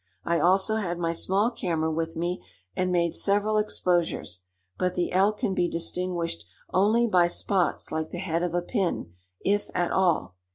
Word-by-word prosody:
I 170 0 +1
also 190 +5 +3
had 175 -5 -2
my 165 -1 -1
small 195 +7 +1
camera 160 -7 -1
with 165 +1 -2
me, 175 +2 -2 0.3
and 185 0 0
made 170 -2 +1
several 205 +2 +2
exposures; 175 - 0 0.4
but 180 0 0
the 175 - -1
elk 200 +3 +3
can 195 - -1
be 175 -2 +1
distinguished 170 - -1 0.3
only 215 +5 +4
by 180 -6 +4
spots 180 +1 0
like 160 0 -2
the - - -6
head 170 -2 -1
of 175 -1 -1
a 175 - 0
pin, 180 - -2 0.3
if 205 +1 +1
at 175 -1 +1
all. 175 - +1
180 Hz, 170 wpm, -26 LUFS, 170-195 Hz, 0.4 s, only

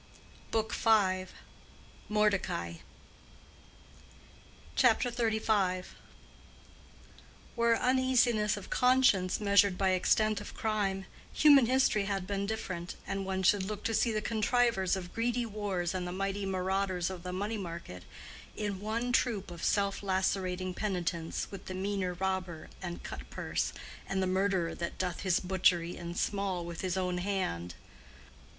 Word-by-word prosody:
BOOK 220 -1 -1
V.—MORDECAI. 195 - -1 2.0
CHAPTER 245 +1 +4
XXXV. 220 -5 +1 1.7
Were 235 0 +3
uneasiness 245 -5 +2
of 205 - -9
conscience 250 -8 +3
measured 200 -2 +4
by 190 -1 +2
extent 210 +3 +2
of 205 - -9
crime, 200 -3 -1 0.3
human 285 -5 +6
history 255 -5 +3
had 195 -2 -2
been 200 +1 -2
different, 185 -5 -4
and 195 0 -3
one 190 0 -1
should 200 +2 +4
look 205 +2 -5
to 225 - -1
see 230 +2 +2
the 215 -1 -1
contrivers 225 -4 +2
of 180 -2 -7
greedy 240 +1 0
wars 200 -5 -2
and 180 -1 -3
the - - -4
mighty 195 +1 -2
marauders 190 -1 0
of 185 -2 -7
the 180 +1 -5
money 205 +4 -2
market 170 - -7 0.5
in 205 -3 -3
one 230 +4 -2
troop 215 -6 +1
of 170 - -8
self 200 -1 +1
lacerating 185 -1 -1
penitents 175 -5 -2
with 195 -1 -8
the 185 - -5
meaner 190 -1 -2
robber 185 -3 -3
and 175 -2 -6
cut - - -8
purse - - -2 0.4
and 190 0 0
the - - +2
murderer 185 -2 +1
that 170 - -5
doth 180 -2 -2
his 185 -3 +2
butchery 180 -2 +2
in 170 0 -6
small 195 -4 -1
with 170 -1 -6
his 185 -1 -1
own 180 -1 -1
hand. 130 - -2
195 Hz, 135 wpm, -31 LUFS, 185-215 Hz, 2.0 s, human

